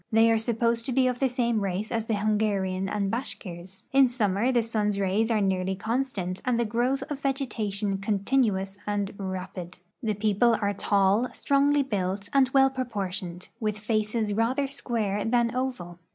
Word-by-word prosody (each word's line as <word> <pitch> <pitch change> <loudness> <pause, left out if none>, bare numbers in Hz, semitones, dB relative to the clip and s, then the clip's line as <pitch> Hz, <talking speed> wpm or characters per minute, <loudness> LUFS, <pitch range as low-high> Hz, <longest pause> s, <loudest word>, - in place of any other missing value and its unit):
They 225 +1 +5
are 225 - +3
supposed 230 0 0
to - - -1
be 260 +1 +3
of 250 -1 0
the 270 - +2
same 235 -3 0
race 195 +2 -2
as 225 -1 -1
the 225 - +1
Hungarian 200 -3 0
and 200 -1 -1
Bashkirs. 190 -6 -6
In 270 -1 +6
summer 225 -1 +1
the 240 -2 +2
sun's 210 -3 0
rays 200 +4 +1
are 220 -2 +2
nearly 190 -1 0
constant, 215 -4 -2
and 245 -2 +1
the 235 - +2
growth 245 +5 0
of 285 - -3
vegetation 215 -8 -2
continuous 200 -1 0
and 205 -1 -2
ra})id. 185 -2 -5 0.2
The 220 -4 -1
people 215 +3 +3
are 205 -1 0
tall, 200 +4 +2
strongly 285 +1 +2
built, 195 -4 -2
and 270 -2 +4
well 270 0 +4
proportioned, 195 -8 -4
with 215 -3 -1
faces 215 0 -1
rather 235 +6 +1
square 225 -7 -2
than 235 0 +1
oval. 215 -10 -3
215 Hz, 165 wpm, -27 LUFS, 195-245 Hz, 0.2 s, In